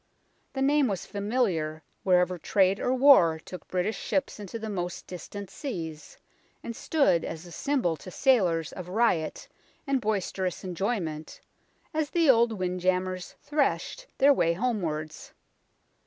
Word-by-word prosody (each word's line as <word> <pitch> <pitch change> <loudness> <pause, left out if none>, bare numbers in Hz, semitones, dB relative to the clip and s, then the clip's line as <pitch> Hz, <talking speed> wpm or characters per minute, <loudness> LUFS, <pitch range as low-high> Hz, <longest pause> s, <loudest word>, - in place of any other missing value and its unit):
The 270 - -1
name 285 0 +4
was 195 -4 -3
familiar 200 -8 -1 0.2
wherever 180 -1 +2
trade 195 +2 +2
or - - 0
war 255 - +6
took 180 +3 -10
British 185 +4 -1
ships 275 -5 -2
into 205 +2 -6
the 220 -1 -6
most 180 -4 -4
distant 190 +2 -8
seas, 165 - -6 0.5
and 235 - -5
stood 275 - +2
as 160 +1 -6
a 175 - -11
symbol 245 - 0
to 185 - -10
sailors 180 - +2
of 180 -2 -7
riot 185 -6 0 0.4
and 275 -3 +1
boisterous 195 -3 -2
enjoy 195 +5 -1
ment, 155 -3 -6 0.5
as 310 -2 0
the 330 -5 +5
old 235 -1 +3
wind 185 -2 -2
j 185 +1 +2
ambers 185 -1 -2
threshed 300 - -1
their 280 +1 +6
way 170 -10 +2
homewards. 170 -8 -3
190 Hz, 145 wpm, -28 LUFS, 175-250 Hz, 0.5 s, war